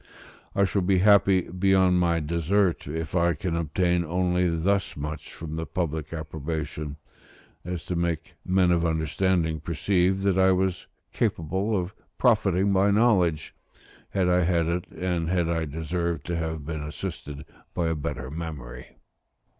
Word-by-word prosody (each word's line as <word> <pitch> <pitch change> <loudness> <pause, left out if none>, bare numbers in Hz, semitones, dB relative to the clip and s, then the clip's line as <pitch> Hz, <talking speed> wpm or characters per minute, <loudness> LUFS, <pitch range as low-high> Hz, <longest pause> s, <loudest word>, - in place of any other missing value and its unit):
I 100 - +4
shall 100 +1 0
be 95 +1 +2
happy 100 -1 +5
beyond 95 0 +2
my 85 -1 +2
desert, 85 +4 +1
if 80 +3 -4
I 85 -1 +3
can 85 +3 -2
obtain 85 +2 +1
only 90 +1 +1
thus 95 +4 0
much 75 +1 -5
from 80 -1 -7
the 80 - -3
public 80 -4 -3
approbation, 80 -1 -4 0.7
as 90 -3 -5
to 90 - -3
make 85 -2 -2
men 90 -1 +3
of 85 -1 +2
understanding 80 0 +1
perceive 90 +5 +1
that 95 -1 +2
I 95 0 +5
was 95 -1 -1 0.3
capable 95 +7 0
of 90 +2 -4 0.2
profiting 100 -5 +3
by 95 +1 +4
knowledge, 100 - +2 0.6
had 95 -2 +1
I 90 0 +3
had 85 -1 +2
it; 85 +2 -2
and 90 -3 -2
that 90 -2 +1
I 85 -1 0
deserved 80 +1 -3
to 85 - -2
have 80 -2 -3
been 80 -1 -4
assisted 75 -1 -6 0.3
by 85 -2 0
a - - +1
better 70 -3 -4
memory. 75 -7 -7
85 Hz, 150 wpm, -26 LUFS, 80-95 Hz, 0.7 s, happy